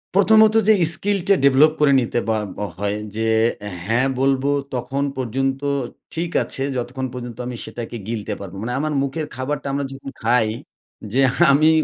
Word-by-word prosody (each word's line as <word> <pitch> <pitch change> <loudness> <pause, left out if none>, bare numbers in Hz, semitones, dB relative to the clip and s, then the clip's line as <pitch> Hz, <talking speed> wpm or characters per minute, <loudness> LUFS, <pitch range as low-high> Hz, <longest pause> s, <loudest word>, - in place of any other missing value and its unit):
প্রথমত 215 +2 +6
যে 220 - +7 0.2
skill 205 +2 0
টা 200 - +6
develop 140 +3 +6
করে 145 -2 +4
নিতে 120 0 -1
বা 110 - +2 0.2
ব - - -8 0.2
হয় 105 +1 -1 0.2
যে, 110 +1 -1 0.6
হ্যাঁ 120 +5 +2
বলবো 135 +1 +2 0.3
তখন 130 +3 -2
পর্যন্ত 135 +2 -1 0.5
ঠিক 170 +1 -2
আছে, 135 - -3
যতক্ষণ 130 +2 -3
পর্যন্ত 120 -2 -7
আমি 125 - -5
সেটাকে 120 0 -6
গিলতে 110 -2 -3
পারবো। 100 -1 -8
মানে 125 +2 -3
আমার 155 +1 -1
মুখের 140 +3 -3
খাবারটা 140 +2 -3
আমরা 140 0 -1
যখন 135 0 -8
খাই, 115 -1 +3 0.7
যে 135 - +2 0.3
আমি 155 +3 +5
135 Hz, 160 wpm, -21 LUFS, 120-145 Hz, 0.7 s, যে